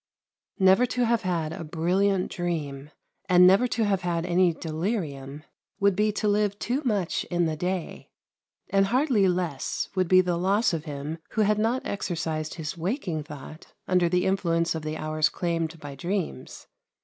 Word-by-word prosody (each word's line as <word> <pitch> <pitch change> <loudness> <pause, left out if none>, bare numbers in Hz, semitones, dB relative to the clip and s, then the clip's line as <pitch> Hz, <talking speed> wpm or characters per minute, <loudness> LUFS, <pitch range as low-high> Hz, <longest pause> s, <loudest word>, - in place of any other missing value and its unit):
Never 190 +5 +5
to 250 0 0
have 235 -1 +2
had 165 -4 -1
a 165 - -6
brilliant 180 +4 0
dream, 150 -5 -3 0.4
and 180 0 +7
never 195 +7 +6
to 230 -2 0
have 195 -2 +1
had 170 -1 -1
any 180 0 +3
delirium, 155 - -4 0.4
would 200 -1 +3
be 210 +2 +2
to 210 - -1
live 205 -1 +1
too 250 +7 -1
much 205 -9 0
in 175 -1 0
the 160 -1 -1
day; 180 +1 -4 0.6
and 195 0 +3
hardly 245 -4 +3
less 175 -6 -2
would 185 -2 +1
be 185 +1 +6
the 180 -2 -1
loss 195 +3 +2
of 160 -1 -3
him 150 +2 -5
who 220 - +1
had 210 0 +2
not 230 +4 0
exercised 160 -5 -3
his 160 -3 -5
waking 175 - -2
thought 150 +2 -11
under 180 -2 +3
the 180 +1 +1
influence 170 -3 +1
of 160 - -4
the 155 +1 -4
hours 155 0 +1
claimed 165 -2 -2
by 145 -1 -8
dreams. 175 +6 -4
180 Hz, 170 wpm, -26 LUFS, 160-200 Hz, 0.6 s, and